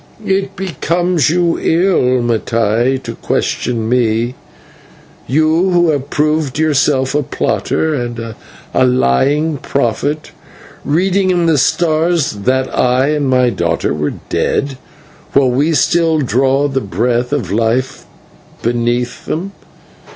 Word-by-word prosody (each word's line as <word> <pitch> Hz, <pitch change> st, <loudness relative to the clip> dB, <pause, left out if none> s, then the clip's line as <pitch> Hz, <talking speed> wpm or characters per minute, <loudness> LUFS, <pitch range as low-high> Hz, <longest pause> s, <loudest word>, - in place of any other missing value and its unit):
"It 195 Hz, 0 st, -1 dB
becomes 175 Hz, -3 st, 0 dB
you 170 Hz, 0 st, +1 dB
ill, 160 Hz, -8 st, +2 dB
Mattai, 115 Hz, +2 st, 0 dB
to -, -, -5 dB
question 115 Hz, -2 st, -2 dB
me 120 Hz, 0 st, +1 dB, 0.9 s
you 155 Hz, -, +2 dB
who 175 Hz, -2 st, +3 dB
have 140 Hz, -1 st, -3 dB
proved 150 Hz, -2 st, 0 dB
yourself 140 Hz, -3 st, +1 dB
a 150 Hz, -, +2 dB
plotter 155 Hz, +3 st, -1 dB
and 120 Hz, -4 st, -4 dB, 0.4 s
a 130 Hz, -, +3 dB
lying 135 Hz, -, +2 dB
prophet, 140 Hz, +4 st, -2 dB, 0.5 s
reading 185 Hz, +5 st, +1 dB
in 175 Hz, -2 st, +2 dB
the 160 Hz, -3 st, +3 dB
stars 160 Hz, +3 st, +1 dB
that 130 Hz, +6 st, 0 dB
I 130 Hz, +2 st, +2 dB
and 150 Hz, -3 st, 0 dB
my 125 Hz, -1 st, +3 dB
daughter 85 Hz, -6 st, -1 dB
were 75 Hz, 0 st, -2 dB
dead, 135 Hz, -2 st, -1 dB, 0.5 s
while 135 Hz, -2 st, +3 dB
we 145 Hz, +6 st, +1 dB
still 165 Hz, +2 st, +2 dB
draw 135 Hz, +1 st, +1 dB
the 135 Hz, -1 st, -2 dB
breath 120 Hz, +5 st, -1 dB
of 125 Hz, -11 st, -2 dB
life 115 Hz, +4 st, -1 dB, 0.6 s
beneath 120 Hz, +1 st, -1 dB
them. 185 Hz, +5 st, -3 dB
135 Hz, 120 wpm, -15 LUFS, 120-160 Hz, 0.9 s, who